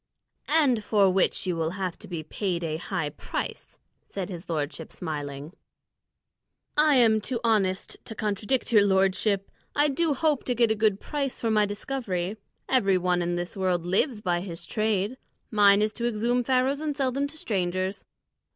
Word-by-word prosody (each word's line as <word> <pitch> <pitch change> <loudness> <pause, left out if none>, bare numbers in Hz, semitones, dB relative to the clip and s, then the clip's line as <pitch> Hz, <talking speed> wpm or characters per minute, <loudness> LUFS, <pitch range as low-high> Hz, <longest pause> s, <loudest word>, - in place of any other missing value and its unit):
"And 280 -8 +3
for 205 -2 +4
which 190 +1 +1
you 180 -2 0
will 160 -1 0
have 185 -3 -2
to - - -10
be 170 -3 -5
paid 175 +1 -2
a 155 -1 -2
high 165 -3 -3
price," 150 - -6 0.3
said 195 -2 -5
his 175 -2 -8
lordship, 150 -3 -3
smiling. 145 -2 -5 1.2
"I 300 -1 +5
am 225 -4 +5
too 240 +2 -3
honest 195 -5 +1
to 220 - -7
contradict 215 +5 -1
your 210 -3 +6
lordship; 195 +1 +1 0.2
I 295 +1 +4
do 300 +1 +1
hope 300 -1 +1
to 250 - 0
get 235 -1 +3
a - - +2
good 210 -2 +2
price 280 -3 -3
for 230 - 0
my 210 -1 +3
discovery. 205 -3 -3 0.3
Every 195 -8 +3
one 180 0 +1
in 175 0 -1
this 175 +4 -4
world 185 -3 0
lives 210 - +1
by 175 -3 0
his 170 -2 -7
trade. 215 +3 0 0.3
Mine 205 -1 +5
is 215 0 0
to 235 -1 -1
exhume 240 +2 +1
Pharaohs 260 +3 +2
and 300 -2 -3
sell 265 -3 +1
them 280 +3 -1
to 315 +2 -12
strangers. 185 - -2
205 Hz, 175 wpm, -26 LUFS, 180-245 Hz, 1.2 s, your